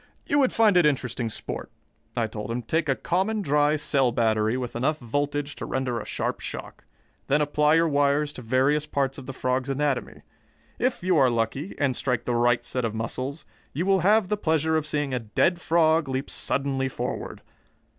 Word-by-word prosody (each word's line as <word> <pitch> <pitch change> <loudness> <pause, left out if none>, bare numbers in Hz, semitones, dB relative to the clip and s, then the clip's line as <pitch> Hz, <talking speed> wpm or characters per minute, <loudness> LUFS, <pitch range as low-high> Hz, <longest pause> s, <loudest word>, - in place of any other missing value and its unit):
"You 290 - +2
would 265 -3 +3
find 215 -4 +4
it 175 - +5
interesting 125 -4 -1
sport," - - -5 0.5
I 115 - +2
told 105 -1 -6
him. 120 +1 -3
"Take 160 +5 0
a 135 - +3
common 195 +7 -1
dry 150 0 +3
cell 135 -4 +2
battery 110 -1 +1
with 125 -2 -5
enough 140 +6 0
voltage 145 +3 -2
to - - -5
render 130 -3 -1
a - - -7
sharp - - -2
shock. - - -8 0.4
Then 145 +2 +3
apply 150 +1 +3
your 165 0 +4
wires 145 0 +1
to - - -8
various 135 +5 +1
parts 140 -2 -1
of 130 - -11
the - - -4
frog's 130 +1 -1
anatomy. 140 -1 -2 0.6
If 250 -6 0
you 180 -2 +3
are 135 -3 +5
lucky, 120 - -2
and 135 -3 +1
strike 125 -2 -1
the 120 - 0
right 120 0 +2
set 125 +1 -2
of 110 -1 -2
muscles, 130 +6 -4 0.3
you 165 +6 -1
will 195 0 +3
have 205 +3 +4
the 210 - 0
pleasure 160 -3 +1
of 155 -1 0
seeing 145 -3 -1
a 125 - 0
dead 170 - +1
frog 160 -2 +3
leap 130 +2 -3
suddenly 135 0 0
forward. - - -5
140 Hz, 195 wpm, -25 LUFS, 125-155 Hz, 0.6 s, it